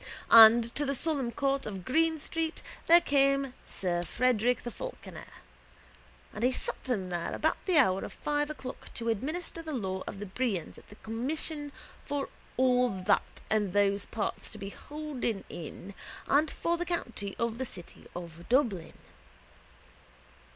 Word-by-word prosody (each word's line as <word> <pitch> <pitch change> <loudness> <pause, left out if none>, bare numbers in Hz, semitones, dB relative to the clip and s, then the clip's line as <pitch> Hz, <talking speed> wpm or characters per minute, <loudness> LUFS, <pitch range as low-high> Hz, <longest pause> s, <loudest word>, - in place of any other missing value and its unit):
And 230 +1 +9
to 295 - +1
the 275 -1 0
solemn 275 -4 0
court 275 0 0
of 190 -4 -6
Green 320 +4 +2
street 320 +2 -2 0.2
there 340 +1 +8
came 275 -2 +2
sir 175 -2 -1
Frederick 245 +4 +1
the 240 - -4
Falconer. - - -8 1.1
And 215 - -4
he 250 - +4
sat 260 - -3
him 195 -7 0
there 175 -1 -2
about - - 0
the 365 -4 +3
hour 195 -10 +4
of - - -6
five 295 0 -1
o'clock 270 -4 -7
to 230 0 -2
administer 310 - -3
the 315 -2 -6
law 190 -5 -2
of 195 - -6
the 205 - -4
brehons 200 -4 -2
at - - -21
the 205 - -12
commission 290 +7 -3 0.3
for 285 -1 -3 0.3
all 250 -1 +4
that - - +1
and 210 -4 +1
those 200 0 +2
parts 215 -3 -3
to 215 - -8
be 195 -1 -6
holden 290 -9 -4
in 175 +4 -8 0.3
and 295 +2 +3
for 340 +4 -1
the 350 - -2
county 235 - -3
of 235 0 -1
the - - 0
city 175 -7 -8
of 170 -1 -8
Dublin. 225 - +2
245 Hz, 160 wpm, -30 LUFS, 200-290 Hz, 1.1 s, And